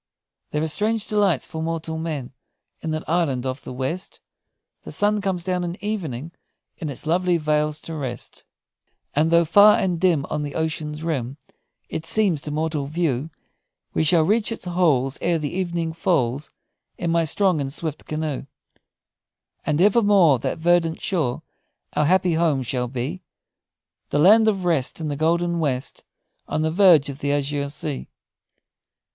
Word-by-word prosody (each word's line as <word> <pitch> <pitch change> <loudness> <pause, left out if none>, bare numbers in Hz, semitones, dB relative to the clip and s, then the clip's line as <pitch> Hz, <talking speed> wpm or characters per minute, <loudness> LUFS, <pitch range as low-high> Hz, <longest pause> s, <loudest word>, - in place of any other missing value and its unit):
"There 150 +1 -1
are - - 0
strange 215 +6 -1
delights 200 - +2
for 160 - -6
mortal 160 0 -3
men 150 -6 -4 0.5
in 165 - -5
that 155 0 -3
island 150 -7 0
of 130 +1 -4
the - - -7
west; 135 +9 -4 0.6
The - - -9
sun 210 0 +1
comes 190 -3 -1
down 180 0 -1
each 175 +3 -5
evening 165 - -3 0.5
in 155 - -4
its 140 - -6
lovely 175 +2 +2
vales 150 -1 0
to 165 - -7
rest; 130 -6 -6 0.7
And 155 +3 +3
though 170 0 +4
far 205 +6 +7
and 180 -3 0
dim 170 -7 +3
On 150 - -1
the 145 -1 -5
ocean's 155 -1 -3
rim 140 -5 -2 0.5
It 160 - -5
seems 195 -9 +2
to 150 - -6
mortal 150 -1 -2
view, 155 -3 -1 0.6
We - - +1
shall 160 +1 +4
reach 215 +6 +1
its 225 - -5
halls 155 -7 +1
Ere 170 -1 +1
the 150 -3 -4
evening 170 -3 -2
falls, 150 -6 0 0.5
In 170 -1 -1
my 170 0 +3
strong 175 0 +2
and 135 -1 -3
swift 155 0 -4
canoe; 155 -3 -3 1.2
And 150 0 +1
evermore 200 - +5
That - - -2
verdant 165 0 +2
shore 155 -10 -1 0.5
Our 150 - +2
happy 180 +1 +3
home 160 -5 +1
shall 125 0 -2
be; 130 +9 -4 0.9
The - - 0
land 215 +8 +6
of 195 -4 +1
rest, 160 -6 0
In 155 -2 -3
the 145 - -2
golden 170 +3 +1
west, 135 -5 -2 0.4
On 155 - -1
the 160 - +1
verge 170 -5 +6
of 140 0 -7
the 140 - -1
azure 145 0 -1
sea! 150 -1 -5
160 Hz, 165 wpm, -23 LUFS, 145-175 Hz, 1.2 s, far